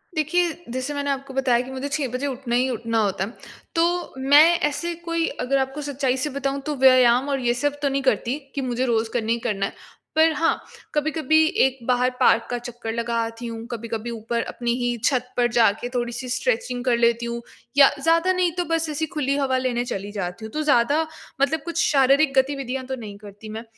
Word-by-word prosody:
देखिए, 335 +3 +1 0.2
जैसे 260 +4 -3
मैंने 285 0 -2
आपको 275 0 -5
बताया 255 -3 +2
कि 265 - -9
मुझे 265 +2 -4
6 280 -1 -1
बजे 260 +3 -2
उठना 255 -3 -3
ही 255 +2 +2
उठना 230 -2 -2
होता 190 -1 -1
है। 225 - -9 0.4
तो 345 +1 +1
मैं 285 +3 +7 0.2
ऐसे 340 +4 -3
कोई 335 0 0 0.2
अगर 275 +2 +2
आपको 270 +2 -2
सच्चाई 270 -2 -1
से 295 +3 -1
बताऊँ 275 0 -2
तो 300 - -2
व्यायाम 255 +1 +6
और 275 - 0
ये 240 -1 +1
सब 290 +3 -2
तो 280 - +1
नहीं 275 0 -1
करती 250 +2 +1 0.2
कि 275 - -1
मुझे 250 0 -1
रोज़ 225 -2 +1
करना 230 -2 -1
ही 235 - +1
करना 210 -4 -1
है। - - -5 0.4
पर 320 +1 +5
हाँ, 330 +1 +1 0.3
कभी-कभी 315 +1 +2 0.2
एक 265 0 -1
बाहर 250 0 +3
पार्क 230 - +4
का 245 - -1
चक्कर 240 -2 -6
लगा 235 0 -2
आती 230 +1 -6
हूँ। 230 0 -6
कभी-कभी 230 0 -4
ऊपर 230 +1 -2
अपनी 235 -1 -2
ही 245 0 0
छत 250 -3 +1
पर 240 -1 +4
जाके 235 0 +2
थोड़ी-सी 245 +1 -3
स्ट्रेचिंग 250 0 -1
कर 240 -2 +3
लेती 235 0 +2
हूँ। 235 0 -4 0.4
या 280 -1 +9
ज़्यादा 330 +4 +3
नहीं 365 -2 +1
तो 355 - 0
बस 325 -1 0
ऐसी 305 +1 -1
खुली 280 -1 0
हवा 265 -2 +1
लेने 245 -1 -1
चली 200 -2 -5
जाती 195 +1 -5
हूँ। 220 - -8
तो 310 - -1
ज़्यादा 285 +1 +3 0.4
मतलब 295 +2 +2
कुछ 340 0 0
शारीरिक 275 +1 +4
गतिविधियाँ 265 -1 0
तो 265 - -4
नहीं 210 -5 -9
करती 205 +1 -12
मैं। 220 +1 -6
255 Hz, 210 wpm, -23 LUFS, 235-285 Hz, 0.4 s, या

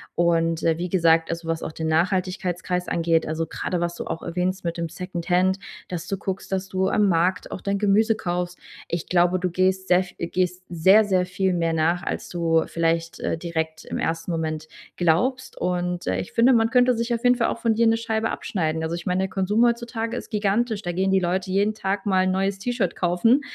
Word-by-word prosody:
Und, 165 -1 +2
ja, 165 -1 +2
wie 180 +1 -3
gesagt, 165 -2 +3
also, 165 0 -5
was 165 0 -2
auch - - -4
den 160 0 -4
Nachhaltigkeitsreis 180 +1 0
angeht, 165 -1 +1
also, 160 +1 -2
grade 180 - -3
was 170 0 -2
du - - -6
auch 165 - -4
erwähnst 180 +2 -2
mit 170 0 -2
dem 170 -1 -3
Secondhand, 180 +1 0 0.3
dass 175 0 -5
du 195 - -2
guckst, 190 +1 -5
dass 190 0 -1
du 190 0 0
am 210 -1 +3
Markt 180 +1 +1
auch - - -6
dein 200 0 -1
Gemüse 215 +2 +3
kaufst. 180 -2 -3 0.3
Ich 170 -1 -3
glaube, 180 +1 +3
du 180 0 -1
gehst 185 +1 +1
sehr 180 +1 +4
v 180 - -14
gehst 180 +1 -1
sehr, 190 +6 +5
sehr 185 -3 +2
viel 185 +1 0
mehr 165 -1 0
nach, 165 +2 +1
als - - -4
du 165 -2 +1
vielleicht, 165 0 -1
äh, - - -2
direkt 160 -1 -4
im - - -4
1. 165 +2 -2
Moment 155 -1 -3 0.3
glaubst. 245 +11 +1
Und, 180 0 -1
äh, - - +1
ich - - -6
finde, 245 +3 +5
man 225 -1 +3
könnte 250 0 +4
sich 235 +1 -1
auf 230 - -2
jeden 250 0 +5
Fall 235 -1 +1
auch - - -3
von 230 -1 +2
dir 230 +1 +3
'ne 225 0 +3
Scheibe 225 -1 -1
abschneiden. 160 -4 -2
Also, 160 +1 -2
ich 170 - -7
meine, 180 0 0
der 190 - -2
Konsum 200 +4 +1
heutzutage 235 0 -1
ist - - -7
gigantisch, 210 +1 0
da 175 - -3
gehen 190 +2 0
die 190 - +4
Leute 185 +1 -1
jeden 200 +3 +2
Tag 195 -1 -2
mal 190 -2 +3
'n - - +2
neues 195 +1 0
T-Shirt 245 +1 -1
kaufen. 180 +10 +3
180 Hz, 220 wpm, -24 LUFS, 170-200 Hz, 0.3 s, sehr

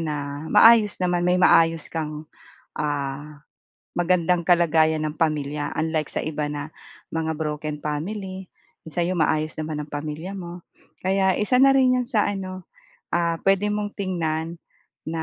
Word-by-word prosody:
na 145 -2 -4
maayos 225 -2 +6
naman, 180 -1 0
may 180 - +3
maayos 165 -2 +4
kang, 155 -1 -4 0.5
ah, 145 0 -4 0.5
magandang 175 -1 +2
kalagayan 160 -3 +3
ng 150 - -4
pamilya, 150 -2 -1
unlike 160 -1 -1
sa - - -3
iba 155 -1 -3
na 145 +1 -5 0.4
mga 160 0 -1
broken 150 -1 -3
family. 185 +5 -4 0.4
Sa'yo 175 +3 -2
maayos 155 0 +1
naman 155 -1 -3
ang 150 - -9
pamilya 155 +6 -5
mo. 175 -1 -8 0.4
Kaya 190 0 +2
isa 250 +4 +2
na 270 +1 +6
rin 255 -1 +4
'yan 250 - -1
sa 215 -5 +2
ano, 185 -2 -5 0.5
ah, 170 -1 +1
puwede 195 +1 +3
mong 210 0 -2
tingnan 165 -4 -2 0.5
na 160 0 -3
165 Hz, 140 wpm, -23 LUFS, 150-185 Hz, 0.5 s, maayos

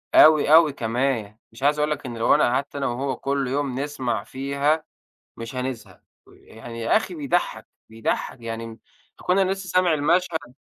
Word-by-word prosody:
أوي، 155 -1 +7
أوي 160 -3 +7
كمان. 115 -3 -1 0.2
مش 115 +3 -12
عايز 150 +1 +3
أقول 150 +1 +1
لك 145 -1 -3
إن 120 -2 -6
لو 115 - +4
أنا - - +3
قعدت 130 +4 0
أنا 140 -1 -1
وهو 130 +2 -2
كل 140 -1 -2
يوم 135 -1 -2
نسمع 125 -7 -2
فيها، 140 +5 -1 0.5
مش 115 +2 -8
هنزهق. 125 -3 -5 0.2
ويعني 115 +1 -11
يا 115 - +2
أخي 220 +11 -1
بيضحّك، 175 - -1 0.2
بيضحك. 115 +2 -3
يعني 115 0 -5
م 115 0 -10 0.4
أكون 180 +2 +1
أنا 190 -1 +2
لسه 195 -1 -6
سامع 180 -1 +3
المشهد 160 -3 0
135 Hz, 175 wpm, -23 LUFS, 115-155 Hz, 0.5 s, أوي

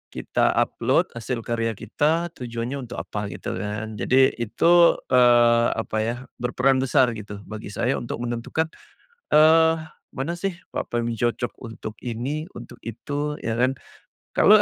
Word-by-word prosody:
kita - - +1
upload - - +1
hasil 115 0 -4
karya 115 -1 -1
kita, 160 - 0
tujuannya 120 -1 -5
untuk - - -7
apa. 105 -1 -4
gitu - - -6
kan. 105 +1 -4
Jadi, 130 +1 +4
itu, 170 +9 +5 0.2
eee, 120 -2 +5
apa 110 -1 -3
ya, 115 +2 0 0.2
berperan 130 +2 +2
besar 130 -1 +3
gitu, 105 -2 -8
bagi 110 +1 -8
saya, 120 +6 -1
untuk 120 0 -5
menentukan, 120 +7 -2 0.6
eee, 160 +1 +6 0.4
mana 140 +6 -3
sih 195 +1 -2 0.2
platform 120 -1 -2
cocok 120 +1 -1
untuk 115 -2 -8
ini, 130 +7 -3
untuk 120 0 -10
itu. 145 +6 -3
Iya 115 0 -2
kan, 125 +2 +3 0.6
kalau, 210 - +6
120 Hz, 140 wpm, -24 LUFS, 115-140 Hz, 0.6 s, eee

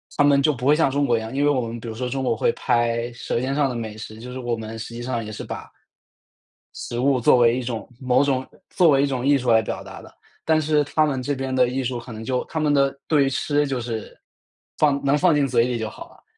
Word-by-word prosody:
他 145 - +3
们 140 -1 +5
就 150 +1 +3
不 125 +1 -3
会 150 - +6
像 155 -4 +3
中 145 +1 +1
国 120 -3 +2
一 - - -3
样， 110 +4 -7
因 140 - +1
为 145 - +4
我 130 -3 +2
们 115 0 -5
比 115 - -9
如 110 - -5
说 125 +1 -3
中 135 +2 -3
国 115 -3 0
会 115 - +2
拍 120 0 0
舌 120 - -3
尖 135 +2 -1
上 145 -2 +2
的 125 - -4
美 110 -2 -5
食， 110 0 -9
就 125 +2 -8
是 130 - -6
我 120 -2 -2
们 110 0 -7
实 115 +1 -7
际 120 - -6
上 120 -3 -3
也 110 - -7
是 - - -7
把 - - -7 1.1
食 120 - -5
物 135 0 +2
作 125 - +5
为 120 0 +4
一 - - -2
种 120 -2 -5
某 130 +1 +2
种 130 -2 0 0.2
作 175 -3 +4
为 140 -1 +4
一 - - +4
种 130 -2 -2
艺 140 0 +5
术 125 -2 0
来 110 0 +5
表 - - -5
达 - - -10
的， - - -15 0.3
但 160 -1 +3
是 150 -1 +2
他 155 +2 +1
们 135 -3 -1
这 145 +2 -2
边 130 0 -3
的 125 -1 +4
艺 130 +1 -2
术 125 -1 -2
可 120 0 -10
能 110 0 -7
就 125 +1 -1
他 160 - -4
们 150 -1 +2
的， 140 -1 +2
对 145 -3 +3
于 - - +1
吃 145 +1 0
就 130 -2 -2
是， 115 -1 -3
呃， - - -24 0.6
放 140 -2 +2
能 140 +2 +3
放 175 0 +4
进 140 -2 +2
嘴 120 -2 +2
里 125 -1 -1
就 110 -1 -3
好 - - -11
了， - - -22
130 Hz, 310 characters per minute, -23 LUFS, 120-140 Hz, 1.1 s, 会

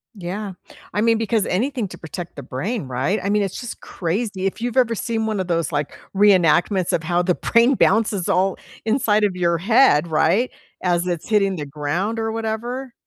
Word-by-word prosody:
Yeah. 195 +1 -5 0.4
I 210 - 0
mean, 230 0 +3
because 225 -1 0
anything 240 +3 -1
to - - -10
protect 175 +2 -8
the 140 - -8
brain, 190 - -3
right? 130 +11 -1
I 200 - -1
mean, 210 0 +2
it's 195 - -4
just 245 -1 -7
crazy, 190 +2 -3
if 195 +3 -2
you've 240 +1 -2
ever 235 -3 +3
seen 225 +1 -2
one 215 -3 -1
of 185 - -2
those, 170 -2 0
like, 145 -1 -3 0.2
reenactments 185 -2 +4
of 165 - 0
how 175 +2 +1
the 180 -1 +1
brain 235 +3 +3
bounces 210 -4 +2
all 190 +1 +2 0.3
inside 220 -3 +2
of 200 -3 +1
your 170 -1 +1
head, 190 - +4
right, 170 +9 +2 0.3
as 175 -1 +1
it's 175 0 -3
hitting 200 -3 +2
the 150 -4 -5
ground 155 +10 -2
or 225 0 -1
whatever. 235 +3 -4
195 Hz, 195 wpm, -21 LUFS, 175-225 Hz, 0.4 s, reenactments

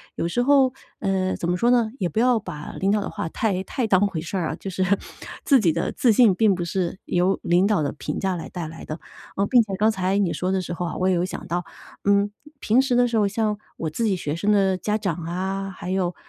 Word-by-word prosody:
有 - - -1
时 245 +8 0
候， 270 -1 +4 0.3
呃， 190 -2 0
怎 170 - -3
么 180 - +1
说 240 +6 +3
呢， 235 -3 +3
也 185 - +1
不 170 - -2
要 245 0 +4
把 160 -7 -8
领 195 +1 +2
导 210 0 +2
的 - - -4
话 - - -4
太 190 0 -1
太 235 +4 -2
当 195 -1 +4
回 175 -5 -4
事 175 +4 -4
儿 170 -3 -1
啊， - - -3
就 195 - -7
是 185 0 -1 0.6
自 275 -3 +5
己 175 -8 +2
的 - - -1
自 245 - +3
信， 215 -3 +5
并 210 +1 +4
不 180 -1 -2
是 180 +1 -2
由 180 +2 +1
领 175 +2 +3
导 205 -5 +2
的 145 - -1
评 - - -4
价 190 -1 0
来 170 - -6
带 175 -3 -5
来 160 +1 -10
的。 155 +2 -6 0.4
呃， 200 - +1
并 245 +1 +6
且 205 -3 -7
刚 215 +2 +3
才 190 -1 0
你 195 -4 +1
说 185 +1 -1
的 190 -1 +1
时 175 - -5
候 175 +1 -3
啊， 170 - -4
我 185 +1 +1
也 185 - +3
有 175 +1 +1
想 185 - -6
到， 175 0 -2 0.4
嗯， 200 0 +3 0.3
平 235 +2 +3
时 265 -2 0
的 245 0 +5
时 230 -1 0
候， 210 -2 +3
像 210 +1 -1 0.2
我 160 - -2
自 225 +10 -2
己 205 -3 +2
学 150 -5 -3
生 200 +5 +1
的 195 -2 +3
家 210 +4 -1
长 200 -5 -1
啊， 190 +3 -3
还 180 - -7
有 185 -2 0
190 Hz, 285 characters per minute, -23 LUFS, 180-215 Hz, 0.6 s, 并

